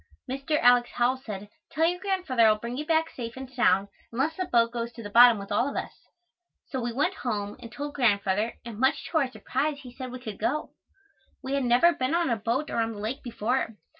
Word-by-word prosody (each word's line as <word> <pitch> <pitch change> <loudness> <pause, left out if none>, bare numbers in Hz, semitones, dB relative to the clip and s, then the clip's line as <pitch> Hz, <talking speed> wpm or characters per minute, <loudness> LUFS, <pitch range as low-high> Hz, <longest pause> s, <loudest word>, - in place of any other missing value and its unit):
Mr. 275 +4 -1
Alex. 245 0 +5
Howell 245 +2 +2
said, 210 -6 -7 0.2
"Tell 320 +2 +2
your 355 +2 +1
Grandfather 360 - +2
I - - +7
will 215 - +1
bring 235 +3 -5
you 300 +3 -4
back 325 -1 +2
safe 235 -1 -7
and 265 0 -6
sound 200 -6 +3 0.2
unless 275 +7 0
the 370 - -2
boat 230 -4 +3
goes 235 0 -3
to 230 - -9
the 205 - -7
bottom 240 0 +8
with 200 0 -8
all 235 +7 +2
of - - -7
us." - - -3 0.8
So 260 - -3
we 240 0 -2
went 295 +10 0
home 210 - -3
and 230 - -10
told 290 +3 -5
Grandfather 210 -3 +1
and 225 -3 -7
much 265 +3 +2
to 320 - +3
our 275 -4 0
surprise 280 +3 -2
he 250 -3 -11
said 255 -1 -7
we 255 - -6
could 220 -5 -7
go. 300 +4 -1 0.7
We 265 +1 -3
had 275 -2 +1
never 245 +9 +5
been 260 +3 -1
on 340 -6 +1
a - - +3
boat 235 +8 -1
or - - -2
on 225 0 0
the - - -10
lake 220 +6 -4
before. 235 -1 -2
245 Hz, 235 wpm, -27 LUFS, 230-280 Hz, 0.8 s, bottom